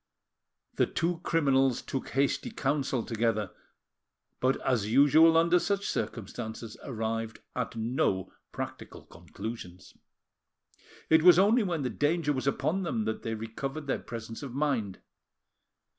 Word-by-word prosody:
The - - +3
two 170 0 -1
criminals 135 -7 +2
took 135 - -4
hasty 140 - 0
counsel 135 - -1
together, 110 -4 -1 0.9
but, 130 +1 +1
as 115 -6 +1
usual 155 +5 +6
under 170 +2 +4
such 200 +2 -1
circumstances, 110 +1 -4
arrived 115 -2 -3 0.2
at 125 -2 -3
no 110 -5 -1 0.2
practical - - -7
conclusions. 95 -6 -9 1.2
It 160 0 +7
was 175 0 +8
only 210 +6 +5
when 175 -7 -1
the 125 - -1
danger 145 +4 +1
was 130 0 -3
upon 155 +7 0
them 115 - -1
that 110 0 -2
they 115 -1 -3
recovered 135 +7 -5
their 135 - -1
presence 115 -1 -7
of 135 -3 -7
mind. 130 -10 -1
130 Hz, 130 wpm, -29 LUFS, 115-155 Hz, 1.2 s, was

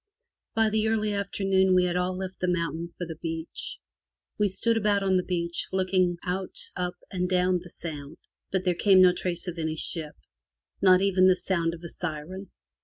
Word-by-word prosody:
By 225 -1 +3
the 220 0 +1
early 215 -1 +1
afternoon 195 -1 +2
we 180 - +5
had 180 -1 0
all 180 +1 0
left 190 0 -6
the 180 - 0
mountain 170 -1 -2
for 175 - -3
the 165 -2 -7
beach. 165 - -5 0.6
We 210 - +4
stood 230 +4 +1
about 205 -2 +2
on 190 -1 +2
the 185 - +3
beach 170 -1 -2
looking 185 -2 +1
out 185 +1 -3 0.2
up 180 0 -2 0.2
and 180 -1 -1
down 180 0 +2
the 175 - -12
Sound, 155 -3 -8 0.3
but 190 -1 0
there 180 - +3
came 190 +1 +5
no 180 -1 +6
trace 180 0 -3
of 175 -1 -4
any 160 -1 -1
ship, 155 -1 -3 0.7
not 185 -1 +6
even 185 -1 +4
the 185 - +6
sound 170 -3 -1
of 170 - -14
a - - -5
siren. 180 +4 -6
180 Hz, 190 wpm, -27 LUFS, 170-190 Hz, 0.7 s, no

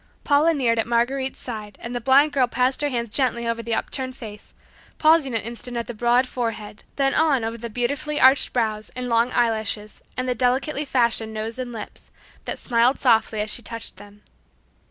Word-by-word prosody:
Paula 295 +3 +4
kneeled 235 -5 +1
at 225 - 0
Marguerite's 260 +3 0
side 215 -4 -7
and 235 - -7
the 245 - -3
blind 275 +5 +4
girl 260 -3 +3
passed 255 +3 0
her 290 - +1
hands 235 -4 -3
gently 235 -3 +1
over 230 0 -1
the 230 0 -1
upturned 260 +2 -3
face, 210 -4 -10 0.4
pausing 310 -5 +4
an 225 - 0
instant 235 +2 -6
at 235 - -2
the 240 - -6
broad 240 +3 +2
forehead, 225 -4 -5
then 270 -1 +1
on 295 -6 +3
over 225 +1 -3
the 235 +1 -6
beautiful 280 +6 -2
arched 265 +2 +5
brows 220 -3 -1
and 250 0 -4
long 230 +1 +2
eyelashes 220 -3 -1 0.2
and 255 0 -2
the 250 - +1
delicately 260 +5 0
fashioned 235 -4 +1
nose 225 +3 -4
and 250 -1 -4
lips, 225 -3 -9 0.4
that - - -4
smiled 240 +2 +2
softly 225 -3 +2
as 210 0 -2
she - - -3
touched 230 -4 -6
them. 205 +1 -15
240 Hz, 195 wpm, -23 LUFS, 225-260 Hz, 0.4 s, arched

